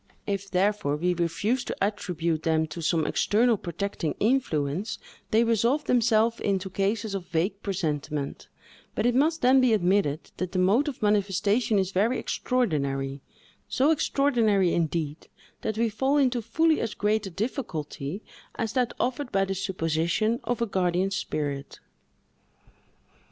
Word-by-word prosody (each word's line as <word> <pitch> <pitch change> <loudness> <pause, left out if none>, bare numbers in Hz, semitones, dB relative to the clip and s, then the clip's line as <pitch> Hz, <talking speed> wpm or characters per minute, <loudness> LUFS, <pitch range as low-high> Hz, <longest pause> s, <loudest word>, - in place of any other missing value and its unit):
If, 200 -1 -3
therefore, 195 -4 +1
we 180 +4 +1
refuse 180 +9 0
to - - -3
attribute 170 -6 -1
them 160 -1 +1
to 165 +3 -6
some 160 -1 +1
external 230 +3 +2
protecting 185 -3 -3
influence, 200 - 0 0.3
they 225 +2 +4
resolve 230 +5 +2
themselves 230 -1 +3
into 190 -1 -1
cases 200 +2 -1
of 190 -3 -4
vague 185 +5 -1
presentiment; 150 -6 -3 0.5
but - - 0
it 245 - +3
must 310 +5 +2
then 260 +1 +6
be 250 -3 +4
admitted 180 -6 +1
that 185 -1 -3
the - - -1
mode 205 +11 +3
of 285 - -5
the - - +1
manifestation 205 +2 +2
is 190 -1 0
very 220 +7 +2
extraordinary; 140 - -1 0.5
so 275 +5 +2
extraordinary, 230 - +2
indeed, 160 -2 -2 0.3
that 215 -1 -2
we 230 +1 +2
fall 265 +7 +1
into 255 -4 +2
fully 315 +8 +2
as 225 -2 -3
great 210 0 0
a - - -5
difficulty 185 - -4 0.3
as 225 - -2
that 250 -3 +1
offered 255 +1 -1
by 195 0 +2
the 195 - -2
supposition 190 +3 0
of 235 0 -1
a - - +2
guardian 185 -2 0
spirit. 145 -7 -3
200 Hz, 145 wpm, -26 LUFS, 170-230 Hz, 0.5 s, then